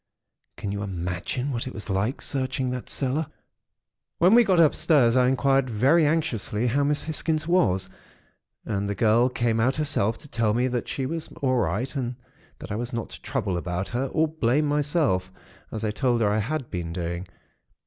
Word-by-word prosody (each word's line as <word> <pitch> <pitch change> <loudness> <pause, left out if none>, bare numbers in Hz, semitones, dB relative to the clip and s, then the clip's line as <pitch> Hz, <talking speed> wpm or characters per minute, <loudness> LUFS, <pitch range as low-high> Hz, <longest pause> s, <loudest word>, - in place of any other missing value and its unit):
Can 100 - -4
you 100 0 -3
imagine 95 +8 -3
what 120 0 -3
it 130 - -7
was 105 - -7
like, 105 +6 -1
searching 130 -2 -1
that 125 -1 -5
cellar? 140 +3 0 0.9
"When 180 +5 +5
we 240 +1 +8
got 190 -5 +3
upstairs, 145 -6 +4
I 125 -1 +4
inquired 135 0 +2
very 135 +9 +4
anxiously 125 -8 -1
how 135 +4 +2
Miss 145 +1 +1
Hisgins 155 0 -1
was, 95 - +2 0.8
and 100 -1 -2
the 100 - -2
girl 115 +4 +3
came 120 -2 0
out 125 +4 +2
herself 145 -8 +1
to - - -14
tell 115 -5 0
me 125 +2 +2
that 120 -2 -2
she 135 - -3
was 160 +3 -3 0.2
all 130 -1 +2
right 125 +4 -1
and 125 -2 -2 0.4
that - - -9
I - - -1
was 120 +2 -3
not 115 -2 -4
to - - -10
trouble 105 -7 -2
about 90 +2 -3
her, 125 +3 -1
or 160 +4 +1
blame 150 -1 +1
myself, 145 - +1 0.4
as 110 0 -3
I 105 - 0
told 120 +1 +1
her 105 -2 +3
I 105 - +1
had 130 +4 -3
been 85 -3 -4
doing. 85 +1 -4
125 Hz, 190 wpm, -25 LUFS, 105-145 Hz, 0.9 s, we